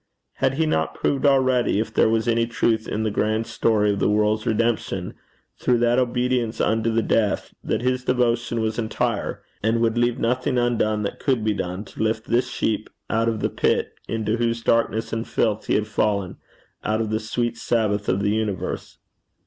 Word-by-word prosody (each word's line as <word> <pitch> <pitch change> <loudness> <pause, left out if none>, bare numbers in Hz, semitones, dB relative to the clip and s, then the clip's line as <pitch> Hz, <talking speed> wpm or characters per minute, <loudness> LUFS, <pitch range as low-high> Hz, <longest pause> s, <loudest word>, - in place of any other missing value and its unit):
Had 135 0 +1
He 160 +2 +1
not 80 - 0
proved 140 0 +1
already, 130 -5 +3
if 110 - -3
there - - +4
was 115 +1 +1
any 115 0 +2
truth 115 -2 0
in 110 - -2
the 110 - 0
grand 110 +2 0
story 110 -2 +2
of 100 - -3
the - - +2
world's 105 +1 +1
redemption 115 +1 0 0.5
through 125 - +2
that 120 +1 +3
obedience 125 -2 0
unto 110 +1 +1
the 115 0 +1
death, 105 -3 0
that 110 - -1
his 125 0 0
devotion 120 -2 +1
was 110 +1 -1
entire, 110 -1 -2 0.2
and 110 +2 +1
would 115 0 +1
leave 120 0 +2
nothing 125 +2 0
undone 110 -3 +1
that 100 - -4
could 130 -6 0
be 110 0 +1
done 95 +1 -4
to - - -9
lift 110 0 0
this 125 +2 +1
sheep 110 -3 -1 0.2
out 115 +1 +2
of 110 -2 -3
the - - +1
pit - - 0
into 110 0 -1
whose 115 0 -1
darkness 115 -1 +1
and 115 +1 -2
filth 110 -2 0
he - - +2
had 105 - +1
fallen 100 -3 -1 0.5
out 110 +1 0
of 110 -1 -2
the 110 - +1
sweet 120 +2 -2
Sabbath 105 -3 0
of 95 +2 +1
the 100 - +2
universe? 105 -3 -3
115 Hz, 190 wpm, -23 LUFS, 110-120 Hz, 0.5 s, there